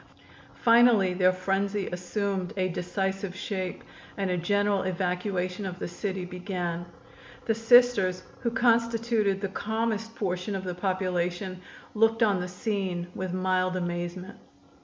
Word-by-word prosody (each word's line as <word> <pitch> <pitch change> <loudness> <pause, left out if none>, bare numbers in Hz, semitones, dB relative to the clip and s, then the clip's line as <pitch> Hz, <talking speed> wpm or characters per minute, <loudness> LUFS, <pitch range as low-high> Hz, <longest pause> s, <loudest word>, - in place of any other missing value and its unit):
Finally 230 -5 +6
their 185 0 +4
frenzy 195 +2 -1
assumed 190 +1 -2
a 185 -1 +2
decisive 190 +2 -2
shape 185 -1 -4 0.3
and 195 -2 0
a - - +1
general 200 +3 +1
evacuation 185 +1 -2
of 185 -2 -4
the - - -4
city 185 +1 -4
began. 180 -2 -4 0.6
The 225 - +2
Sisters, 225 -5 +4 0.2
who 235 - 0
constituted 230 -3 +2
the 200 - 0
calmest 225 +2 -2
portion 185 0 -2
of 190 - -3
the 180 -1 -3
population, 185 0 -2 0.3
looked 225 +1 +3
on 205 -4 +3
the 180 - -3
scene 180 -2 -2
with 185 -1 -4
mild 185 0 +1
amazement. 175 +1 -4
190 Hz, 130 wpm, -28 LUFS, 180-210 Hz, 0.6 s, Finally